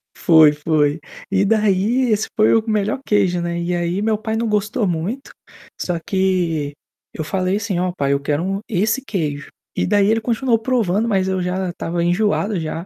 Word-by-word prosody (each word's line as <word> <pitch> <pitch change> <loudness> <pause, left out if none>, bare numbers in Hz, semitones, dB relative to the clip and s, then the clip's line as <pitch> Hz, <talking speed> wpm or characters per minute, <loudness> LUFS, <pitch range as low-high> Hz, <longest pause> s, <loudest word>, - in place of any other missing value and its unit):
Foi, 160 -3 +6
foi. 150 0 0 0.3
E 195 0 +2
daí, 215 +4 +2
esse 215 0 +1
foi 215 - +4
o 225 - +2
melhor 215 +4 0
queijo, 190 -4 +1
né. 170 0 -2
E 175 +1 -1
aí 175 +2 -1
meu 215 0 +1
pai 220 0 -3
não 230 +1 -1
gostou 210 0 0
muito, 180 +11 -3 0.5
só 175 -2 -2
que 175 -5 -1 0.4
eu 155 - -4
falei 185 +4 -1
assim: 205 -4 -2
"Ó, 180 0 0
pai, 140 0 +1
eu 140 - +1
quero 145 +3 -1
um 195 +1 -2
esse 215 +6 0
queijo". 150 - -3 0.3
E - - 0
daí 200 0 +3
ele 225 +1 +2
continuou 235 +1 +1
provando, 225 -3 0
mas 190 -4 +1
eu 190 -1 -1
já 180 +1 -2
estava 170 0 -3
enjoado 200 +2 +1
já. 165 +2 -4
190 Hz, 185 wpm, -19 LUFS, 170-215 Hz, 0.5 s, Foi